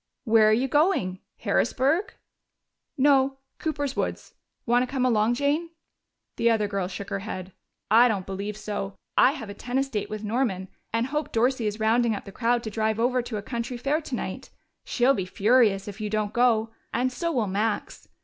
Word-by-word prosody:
"Where 220 -2 +5
are - - +4
you 245 +5 +2
going? 280 - +2 0.2
Harrisburg?" 325 - +1 0.8
"No. 270 -1 +4 0.2
Cooper's 290 -4 -2
woods. - - -3 0.3
Want 240 +1 +3
to 255 - -2
come 260 -2 +1
along, 230 -1 +3
Jane?" 290 +5 0 0.7
The 235 - +3
other 220 -2 +2
girl 200 -3 -2
shook 195 +1 -7
her 200 - -1
head. 190 -2 -6 0.4
"I 235 +3 +7
don't 200 -6 -1
believe 200 +2 -5
so. 205 -2 -4 0.2
I 265 - +5
have 255 -8 -7
a - - -6
tennis 255 +6 -2
date 210 -6 -3
with 215 0 -5
Norman, 210 -4 -1 0.2
and 230 +1 +1
Hope 300 +3 -3
Dorsey 240 0 +1
is 210 +1 -3
rounding 225 +1 +2
up - - -7
the 200 - -9
crowd 235 +3 +1
to 220 - -5
drive 220 0 0
over 250 +2 +2
to 235 -2 -5
a 200 - -5
country 235 +2 -4
fair 285 +6 0
tonight. 270 -5 -5 0.4
She'll 250 +2 +3
be 190 -8 -2
furious 210 -1 +3
if 205 +1 -7
you 210 - -2
don't 215 0 -1
go 230 -2 +3 0.2
and 255 +2 0
so 335 +6 -2
will 245 -8 +1
Max. 210 +3 -2
230 Hz, 190 wpm, -26 LUFS, 210-260 Hz, 0.8 s, I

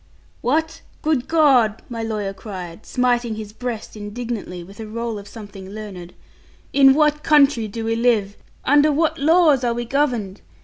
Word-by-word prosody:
'What! 320 +5 0 0.2
Good 295 -5 0
God!' 265 -9 +3
my 230 -2 -5
lawyer 210 -3 -3
cried, 185 -3 -9
smiting 245 -3 +1
his 215 -1 -8
breast 235 -2 -5
indignantly 205 -4 -6
with 195 +4 -14
a 220 - -6
roll 230 0 -4
of 200 - -12
something 200 -3 -10
learned; 195 -4 -9 0.6
'in 270 -1 +6
what 300 0 +2
country 285 -7 +4
do 225 +2 -5
we 225 0 0
live? 225 -4 +1 0.3
Under 290 +2 +5
what 310 +1 +1
laws 310 -3 +4
are 235 -1 0
we 240 0 -3
governed? 235 -7 -1
235 Hz, 160 wpm, -21 LUFS, 210-280 Hz, 0.6 s, in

